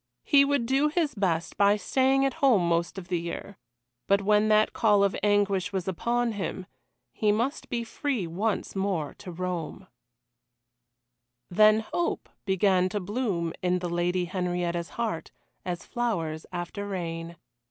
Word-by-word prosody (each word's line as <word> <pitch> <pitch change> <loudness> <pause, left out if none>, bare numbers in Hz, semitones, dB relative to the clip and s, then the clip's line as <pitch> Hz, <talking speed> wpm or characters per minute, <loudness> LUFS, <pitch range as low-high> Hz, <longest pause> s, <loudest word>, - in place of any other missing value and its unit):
He 280 -2 +5
would 280 -3 +1
do 270 +4 +2
his 310 -2 0
best 175 -6 -1
by 200 0 +5
staying 265 +5 +2
at 270 - 0
home 225 -11 +4
most 170 +2 0
of 180 -2 -7
the 175 -2 0
year 170 +4 -6 0.5
but 200 0 +4
when 210 +1 +3
that 215 0 +4
call 210 -3 +4
of 200 -1 +2
anguish 205 -2 +2
was 190 -2 -3
upon 235 +6 0
him, 190 -2 -4 0.5
he 210 -1 +2
must 235 +8 -1
be 235 -1 -1
free 240 - -2
once 200 +7 -2
more 190 -6 -1
to 190 -3 -8
roam. 180 +1 -4 1.7
Then 215 +3 +5
hope 340 +10 -2 0.2
began 190 -1 +3
to 205 - -2
bloom 195 -5 -2
in 180 0 +1
the 180 -1 -3
Lady 175 +1 0
Henrietta's 175 -1 -2
heart 225 -8 -2 0.4
as 175 -1 -4
flowers 170 -11 -2
after 180 +3 -5
rain. 170 -3 -4
195 Hz, 150 wpm, -27 LUFS, 175-225 Hz, 1.7 s, He